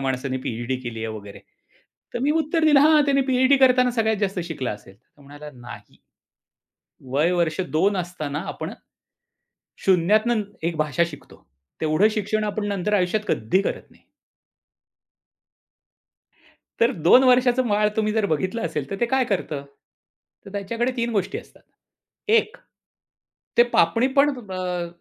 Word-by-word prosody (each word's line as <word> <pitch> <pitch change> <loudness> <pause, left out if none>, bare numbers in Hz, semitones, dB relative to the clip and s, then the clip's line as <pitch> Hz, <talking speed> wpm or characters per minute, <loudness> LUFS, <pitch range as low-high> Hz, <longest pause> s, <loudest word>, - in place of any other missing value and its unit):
माणसाने 130 0 -2
पी-एच-डी 120 +3 -3
केली 120 -3 -6
आहे - - -3
वगैरे. 100 -1 -11 0.7
तर - - -1
मी 285 - +2
उत्तर 320 +1 +1
दिलं 295 -3 +6
हां, 305 +1 +5
त्याने 275 -1 +2
पी-एच-डी 260 +2 +4
करताना 255 -1 +4
सगळ्यात 220 -2 0
जास्त 195 -2 -1
शिकलं 155 -7 -4
असेल. 105 -2 -10
तर 135 +6 -26
म्हणाला 145 +2 -11
नाही. 120 -1 -12 1.1
वय 150 +6 +2
वर्ष 170 -2 0 0.2
2 195 +5 +2
असताना 155 -5 -4
आपण - - -5 1.1
शून्यातून 210 +5 +3 0.2
एक 170 0 -1
भाषा 155 +1 +1
शिकतो. 145 -4 -14 0.4
तेवढं 155 +6 +3
शिक्षण 215 0 -1
आपण 210 0 -3
नंतर 200 0 -2
आयुष्यात 205 +2 +1
कधी 115 - +1
करत - - -5
नाही. - - -24 2.8
तर 230 +2 +4 0.2
2 255 +8 +7
वर्षाचं 250 0 +3
बाळ 210 0 +2
तुम्ही 215 -1 0
जर 220 -2 +1
बघितलं 190 +9 -2
असेल 150 -4 -4
तर 195 - -5
ते 240 - +2
काय 260 -1 +2
करतं? 155 -9 -3 0.8
तर 200 - -11
त्याच्याकडे 230 +5 -2
3 235 0 -1
गोष्टी 200 -4 -1
असतात. - - -13 0.7
एक 450 +2 +2 1.0
ते 240 - +8
पापणी 230 +10 +3
पण 280 +1 +6 0.2
अ, 180 -2 -3
195 Hz, 140 wpm, -23 LUFS, 155-240 Hz, 2.8 s, ते